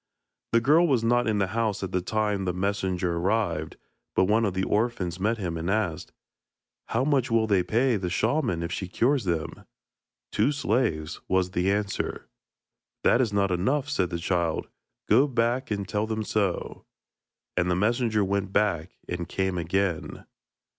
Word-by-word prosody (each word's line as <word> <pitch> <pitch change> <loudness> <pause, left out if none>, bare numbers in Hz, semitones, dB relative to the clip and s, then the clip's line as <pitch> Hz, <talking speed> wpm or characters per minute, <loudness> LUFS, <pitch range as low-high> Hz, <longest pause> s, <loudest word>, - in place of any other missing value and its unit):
The 115 - +4
girl 155 +7 +5
was 130 -7 +2
not 120 +1 +2
in 110 -1 +1
the 100 - +2
house 110 -4 0
at 95 - -4
the 90 - 0
time 105 0 -1
that 90 - 0
the - - -8
messenger 95 -3 -1
arrived, 85 -4 -1 0.4
but - - +4
one 110 +4 +3
of 95 -3 -2
the 95 - 0
orphans 105 -6 -1
met 110 +4 +1
him, 90 -5 -3
and 80 +2 -3
asked: 100 -6 -1 0.8
'How 115 +3 0
much 140 -4 +2
will 115 -1 +3
they 100 -4 +3
pay 120 +5 +2
the 90 -2 -3
shaman 110 - 0
if 85 - -4
she 95 - -3
cures 125 +6 +1
them?' 85 -3 -2 0.7
'Two 145 - +2
slaves,' 105 - -1
was 95 -1 +1
the 90 +2 +1
answer. 100 -1 -2 0.8
'That 120 - +4
is 115 -5 0
not 100 -1 +1
enough,' 130 +11 0
said 95 -11 0
the 85 - -3
child; 85 -1 -1 0.4
'go 140 - +5
back 120 0 0
and 100 -2 -2
tell 105 +2 -1
them 110 0 -2
so.' 100 -4 -2 0.7
And 90 0 +1
the 90 - +2
messenger 110 +1 +1
went 100 0 -1
back 95 -5 0
and 85 -1 -4
came 95 -2 -1
again. 85 0 -2
100 Hz, 175 wpm, -26 LUFS, 90-115 Hz, 0.8 s, girl